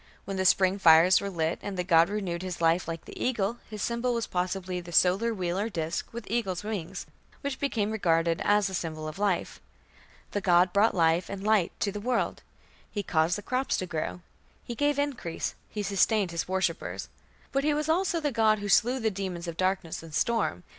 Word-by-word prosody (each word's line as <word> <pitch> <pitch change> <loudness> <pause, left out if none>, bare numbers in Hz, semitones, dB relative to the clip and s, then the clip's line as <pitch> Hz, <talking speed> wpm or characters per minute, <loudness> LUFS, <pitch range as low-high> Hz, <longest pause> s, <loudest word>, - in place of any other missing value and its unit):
When 195 - -4
the 190 - 0
spring 190 +1 +4
fires 165 +1 +6
were 200 - -3
lit, 165 -3 -1
and 200 -2 -5
the 180 - 0
god 170 -1 +4
"renewed 190 -5 -3
his 185 -2 -5
life 165 +2 +2
like 165 -1 -5
the - - -7
eagle", 235 -2 0
his 215 -3 -5
symbol 235 +1 0
was 230 -1 -1
possibly 180 0 -2
the 175 0 -10
solar 190 +7 +3
wheel 185 -3 -2
or 215 +3 -1
disk 165 -5 -3
with 235 -2 -7
eagle's 195 -5 -1
wings, 195 -4 -5 0.4
which 280 -2 -3
became 220 -7 0
regarded 165 -5 +1
as 205 0 +3
a 190 - -6
symbol 155 -3 -4
of 155 +5 -7
life. 200 -4 -1 0.7
The 205 - -2
god 180 -1 +4
brought 205 +2 +3
life 165 0 +2
and 200 -1 -6
light 210 -5 +3
to 200 - +1
the 205 - -5
world; 245 +2 -1 0.5
he 205 - -3
caused 165 0 +1
the 205 - -8
crops 255 +3 0
to 185 - -2
grow; 175 +1 -4 0.4
he 240 - -5
gave 290 +3 +1
increase; 270 - -2 0.2
he 210 - -4
sustained 200 -1 +2
his 170 -1 -3
worshippers. 190 +1 -2 0.4
But 275 0 0
he 300 0 +2
was 300 +1 -1
also 340 +1 +1
the 295 -2 -1
god 220 -2 +3
who 205 0 -5
slew 245 +7 +4
the 220 -2 0
demons 185 -3 -5
of 170 - -4
darkness 185 -2 -1
and 160 -2 -9
storm. 210 - 0
195 Hz, 205 wpm, -28 LUFS, 175-220 Hz, 0.7 s, fires